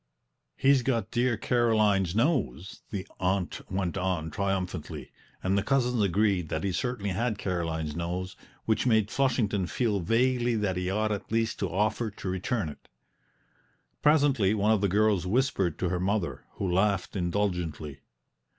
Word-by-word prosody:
"He's 135 -1 +4
got 120 -5 -1
dear 120 -1 +1
Caroline's 110 -7 +2
nose!" 110 - 0
the 100 -1 -5
aunt 95 -1 -1
went 95 -1 -1
on 90 -4 -1
triumphantly; 95 -3 -3 0.3
and 95 +1 +1
the 100 - +2
cousins 125 -1 +1
agreed 100 -3 +1
that 80 - -2
he 100 - 0
certainly 105 -1 -2
had 110 +3 -1
Caroline's 80 -6 -2
nose, 90 +2 -3 0.3
which 110 +2 +1
made 110 -3 +3
Flushington 110 -8 +1
feel 110 0 0
vaguely 120 +5 +2
that 105 -4 0
he 90 0 -2
ought 110 +2 0
at 100 -1 -4
least 115 0 0
to 100 - -1
offer 105 +5 0
to 100 -1 -8
return 95 +2 -1
it. 75 - -11 1.1
Presently 140 -9 +4
one 105 +1 +2
of 110 -3 +3
the 100 - +2
girls 100 -2 +2
whispered 100 - +1
to 90 - -1
her 90 0 -1
mother, 95 0 -1
who 100 - -3
laughed 100 0 +1
indulgently. 85 -6 -2
100 Hz, 150 wpm, -28 LUFS, 90-115 Hz, 1.1 s, He's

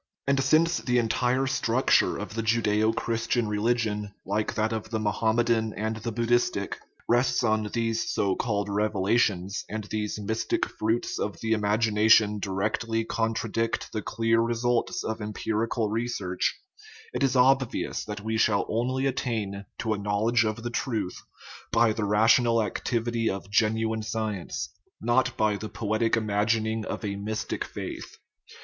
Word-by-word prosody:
And 140 -1 +2
since 165 +5 +3
the 125 -1 0
entire 125 +3 +1
structure 130 -1 +2
of - - -6
the 115 - -2
Judaeo 110 -1 +2
Christian 115 0 0
religion, 105 -1 0
like 105 +2 -1
that 110 +1 0
of 110 -1 -4
the 110 -1 -1
Mo 105 -1 +1
hammedan 110 +1 +1
and 110 +1 -2
the 115 +2 -4
Buddhistic, 120 +2 0 0.3
rests 120 +1 +2
on 110 -2 +1
these 115 -1 -1
so 100 -4 +1
called 105 -3 -1
revelations, 100 -1 +1
and 110 0 -4
these 105 0 -3
mystic 110 +2 -1
fruits 110 +2 -1
of 105 - -3
the 110 - -2
imagination 105 0 +3
directly 110 +3 -1
contradict 115 0 -1
the 110 - -3
clear 115 +2 +1
results 120 +1 0
of 110 0 -3
empirical 110 +1 -1
re 115 +2 0
search, 90 -6 -1 0.6
it - - -3
is 135 -1 +2
obvious 130 -1 +2
that 105 -1 -6
we 110 +1 -1
shall 105 -3 +3
only 130 +4 0
attain 110 -7 -2
to 110 -2 -1
a 105 - -3
knowledge 110 +3 +2
of 110 +1 -3
the 120 - -3
truth 110 -7 -2 0.5
by 115 -1 +4
the 105 -1 -2
rational 115 +2 +4
activity 115 +1 -1
of 100 +1 -5
gen 110 +1 +3
uine 110 0 -1
science, 110 -4 -3 0.3
not 120 +2 +1
by 105 -1 +2
the 110 +1 -6
poetic 110 +1 0
imagining 110 +1 0
of - - -4
a 100 -1 -2
mystic 105 +2 -3
faith. - - -7
110 Hz, 150 wpm, -27 LUFS, 105-115 Hz, 0.6 s, by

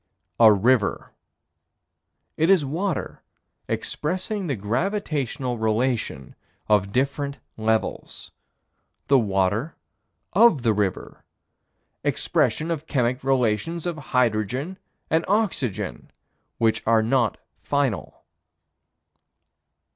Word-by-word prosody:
A 110 -2 +9
river. 105 +2 +2 1.2
It 160 +3 +2
is 185 -7 +5
water 170 +7 -3 0.5
expressing 185 +5 -2
the 140 - -1
gravitational 130 - -2
relation 110 - -1 0.3
of 100 -2 +2
different 140 +3 -1 0.2
levels. 110 0 -2 0.8
The 135 -1 +6
water 100 - 0 0.6
of 200 - +5
the 115 -2 +3
river. 100 -3 -3 0.8
Expression 160 +2 +1
of 160 -1 -4
chemic 125 -1 0
relations 135 - 0
of 175 -2 -2
hydrogen 125 - 0 0.3
and 160 +1 +3
oxygen 135 - -1 0.5
which 115 -1 +2
are 115 -1 +4
not 120 -1 +1 0.2
final. 140 -7 -2
130 Hz, 85 wpm, -24 LUFS, 110-160 Hz, 1.2 s, A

